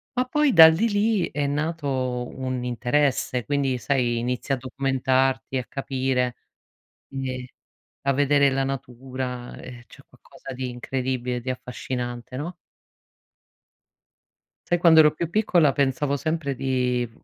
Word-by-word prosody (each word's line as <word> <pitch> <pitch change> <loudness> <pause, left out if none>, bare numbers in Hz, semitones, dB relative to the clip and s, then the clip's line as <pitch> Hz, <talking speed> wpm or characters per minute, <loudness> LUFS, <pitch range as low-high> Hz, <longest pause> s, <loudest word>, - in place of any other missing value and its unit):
Ma 250 0 +1
poi 295 +2 +2
dal 160 -4 +9
lì, 225 +8 +1
lì 205 -2 +1
è 145 -1 -1
nato 150 +2 -2 0.5
un 130 -1 -3
interesse, 125 0 0
quindi 140 -3 0
sai, 120 -2 0
inizia 125 +3 -1
a - - -8
documentarti, 130 0 0
a 125 - -3
capire, 130 -2 -1 0.8
quindi, 130 -2 -5 0.5
a 140 - +2
vedere 140 0 +3
la 135 0 0
natura, 125 -1 -5
ehm, 120 -1 -10
cioè - - -16
è - - -46
qualcosa 135 - -12
di 130 0 -4
incredibile, 125 0 -3
di 125 - -8
affascinante, 125 -1 -5
no? 160 +7 -5 2.2
Sai 175 - +2
quando 165 -2 +6
ero 150 -1 +6
più 165 +1 -3
piccola 175 -7 +3
pensavo 140 +1 0
sempre 155 -1 -2
di 125 -2 -1
135 Hz, 130 wpm, -24 LUFS, 125-145 Hz, 2.2 s, dal